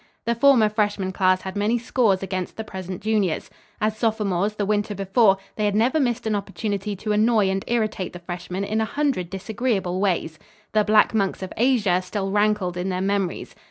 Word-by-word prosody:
The 235 - +2
former 240 -2 +5
freshman 205 -3 -1
class 185 0 +2
had 190 -1 -6
many 210 +4 +1
scores 225 -5 +1
against 185 -1 -4
the 220 - -3
present 190 -3 -7
juniors. 210 -6 0 0.3
As 215 0 0
sophomores, 210 -3 0
the 205 - -1
winter 210 +1 0
before, 195 +1 +3 0.2
they 215 - 0
had 205 -1 +1
never 245 +8 +2
missed 245 -3 0
an 220 - 0
opportunity 205 0 -3
to 210 +3 -4
annoy 215 -2 +3
and 195 0 -2
irritate 215 -5 -1
the - - -7
freshmen 175 +2 -5
in 215 +2 -1
a - - +1
hundred 265 - -1
disagreeable 195 -2 -2
ways. 175 -5 -1 0.3
"The 215 -1 +3
Black 215 +1 +4
Monks 195 -3 0
of 185 - -6
Asia" 220 -7 +2
still 195 +1 -3
rankled 205 -3 +1
in 180 +2 -2
their 185 -1 -1
memories. 195 -1 -2
205 Hz, 190 wpm, -23 LUFS, 190-220 Hz, 0.3 s, former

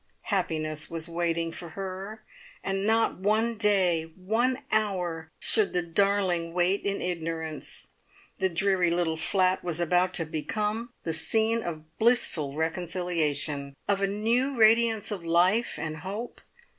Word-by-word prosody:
Happiness 155 -5 -1
was 165 0 -4
waiting 170 -1 -1
for 170 +1 -8
her, 195 +3 -6 0.4
and 195 +1 -1
not 225 -3 +2
one 220 +4 +1
day, 185 -7 +2
one 240 +8 0
hour, 180 -7 -1
should 215 -3 +3
the 180 - +1
darling 175 -1 +1
wait 180 +3 +2
in 200 0 -2
ignorance. 165 -3 -4 0.5
The 190 - +2
dreary 185 0 +2
little 170 -1 0
flat 185 +3 +1
was 175 -2 -2
about 180 +2 +2
to 165 - +3
become 210 +9 -3
the 165 - -2
scene 220 +7 +2
of 155 -4 -8
blissful 180 - +2
reconciliation; 160 -4 -1
of 200 -1 +1
a 195 - +2
new 235 +7 +1
radiance 225 -1 +4
of 195 -4 -4
life 180 +7 +2
and 155 0 -4
hope. 200 +9 -6
185 Hz, 135 wpm, -27 LUFS, 165-210 Hz, 0.5 s, radiance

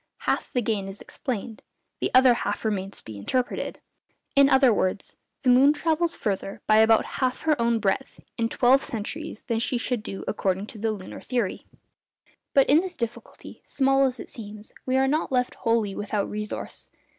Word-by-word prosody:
Half - - -1
the 245 -3 +1
gain 205 -3 -1
is 195 +1 -8
explained, 230 -3 -5 0.4
the - - 0
other 255 -1 +7
half 210 -2 -3
remains 195 -2 -2
to - - -9
be 110 -2 -8
interpreted; 250 - -2 0.6
in 275 0 +6
other 265 -3 +5
words, 190 0 -1 0.3
_the 250 -2 +5
moon 275 +4 +6
travels 330 +2 0
further 195 -2 -3
by 215 - +4
about 220 0 +5 0.2
half 255 -1 0
her 315 -1 +3
own 235 0 +2
breadth 210 +5 -1 0.2
in 230 -1 0
twelve 260 +3 +4
centuries 230 +4 -4
than 230 -1 -1
she 245 +2 +1
should 240 -1 -1
do 195 -3 -7
according 190 +1 -1
to 215 - -11
the 220 +1 0
lunar 195 -3 -7
theory_. 240 -6 -2 0.9
But 275 - +6
in 295 +3 +6
this 370 -1 -6
difficulty, 240 - -7
small 270 0 +2
as 255 -2 -5
it - - -9
seems, 210 -1 -10
we 260 +1 +2
are 265 0 +3
not 305 +2 0
left 250 -1 +1
wholly 230 -3 0
without 205 0 -2
resource. 210 0 -5
235 Hz, 180 wpm, -25 LUFS, 210-265 Hz, 0.9 s, other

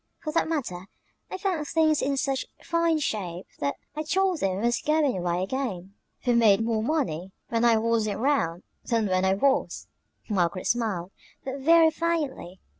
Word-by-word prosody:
For 305 -2 -3
that 330 - +1
matter, 195 - -3 0.4
I - - -4
found 365 -6 -2
things 315 -1 +2
in 275 0 0
such 270 -1 -1 0.2
fine 335 -1 +1
shape 190 - -3
that 140 0 -1 0.2
I 305 - -2
told 370 +2 +1
them 190 -1 0
I - - -3
was 240 0 +1
going 305 -3 +2
away 175 0 -1
again. 195 -5 -4 0.3
We 245 - +3
made 225 -3 +5
more 225 -2 0
money 215 - -1 0.2
when 230 0 0
I 235 -1 +5
wasn't 220 -2 0
'round 225 - 0 0.2
than 230 -2 0
when 185 -1 +1
I 190 0 +3
was!" 270 +6 +1 0.4
Margaret 185 -3 0
smiled, 205 -7 -1 0.3
but 270 +1 -4
very 325 +3 +5
faintly. 305 - -2
235 Hz, 170 wpm, -26 LUFS, 190-305 Hz, 0.4 s, made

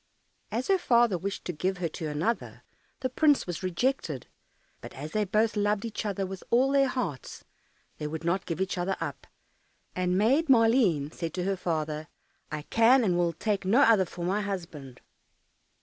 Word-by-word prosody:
As 235 +4 -2
her 385 -1 +3
father 235 - +3
wished 195 +4 -4
to 180 - -3
give 185 +5 -1
her 180 -1 -1
to 160 0 -5
another, 155 +11 -2 0.4
the 255 - -1
prince 295 +1 +3
was 175 -3 -5
rejected; 185 - -1 0.6
but - - -9
as 150 +3 -7
they 215 -1 0
both 215 +2 +1
loved 205 +1 0
each 220 -1 -4
other 195 -1 -2
with 190 0 -7
all 255 +3 +3
their 275 -1 +4
hearts, 205 - -4 0.6
they 150 - -3
would 160 +2 -5
not 170 +3 -1
give 165 0 -3
each 190 -1 -1
other 190 +2 -1
up, - - -5 0.7
and 180 0 0
Maid 270 +10 +3
Maleen 225 - +4
said 165 -2 -5
to 180 - -2
her 195 +1 0
father, 155 -3 -3 0.4
"I 155 -1 -4
can 235 - +4
and 185 -5 +2
will 175 -1 +1
take 205 0 -1
no 215 +9 +4
other 220 -8 +5
for 175 -1 -6
my 195 +4 0
husband." 170 -10 -6
195 Hz, 180 wpm, -28 LUFS, 170-230 Hz, 0.7 s, other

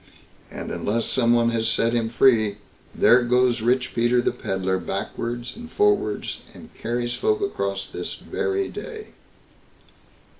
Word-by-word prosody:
And - - -7
unless 115 +3 -1
some 120 -2 +2
one 115 0 +3
has 115 -1 0
set 115 0 +2
him 115 -1 0
free, 110 -4 +3 0.4
there 125 +2 +6
goes 125 0 +2
Rich 125 +3 +1
Peter 120 +1 +2
the 120 - +1
Pedlar 95 0 -2
backwards 115 +5 -4
and 240 +1 -10
forwards, 415 0 +1
and 230 - -13
carries 120 +1 -2
folk 430 - +1
across 400 -1 -2
this - - -6
very 395 -3 -2
day. 440 -3 -8
120 Hz, 140 wpm, -24 LUFS, 115-135 Hz, 0.4 s, there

